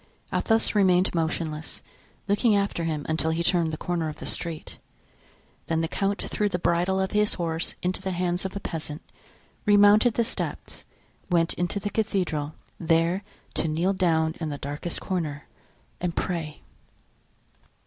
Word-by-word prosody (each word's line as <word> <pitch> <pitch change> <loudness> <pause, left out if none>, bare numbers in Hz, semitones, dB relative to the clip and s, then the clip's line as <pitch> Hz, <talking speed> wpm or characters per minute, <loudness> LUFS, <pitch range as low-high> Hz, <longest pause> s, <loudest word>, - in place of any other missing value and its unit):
Athos 225 0 +2
remained 185 -3 +4
motionless, 160 -2 -2 0.4
looking 210 +2 +3
after 200 -4 0
him 155 -3 -2
until 160 0 +1
he 165 +1 0
turned 170 -2 +3
the 155 - -4
corner 170 -2 -1
of 150 - -7
the - - -8
street. 165 -3 -3 0.9
Then 160 0 +1
the 165 - 0
count 200 +4 -1
threw 210 -1 0
the 180 - -1
bridle 175 +2 +1
of 190 0 0
his 210 0 +2
horse 165 -2 -1
into 180 +1 -1
the 190 - -2
hands 180 0 0
of 190 0 -4
a - - -2
peasant, 155 -4 -5 0.6
remounted 205 +3 +6
the 235 - +3
steps, - - -5 0.4
went 170 -2 +3
into 175 +3 -1
the 205 +1 -3
cathedral, 180 -9 -1 0.2
there 165 +3 +2 0.3
to - - +1
kneel 170 +5 +1
down 160 -4 +2
in 160 -2 -2
the 145 - -4
darkest 145 +5 -4
corner 155 -6 -3 0.5
and 175 -2 -2
pray. 165 -4 -3
175 Hz, 155 wpm, -26 LUFS, 160-195 Hz, 0.9 s, remounted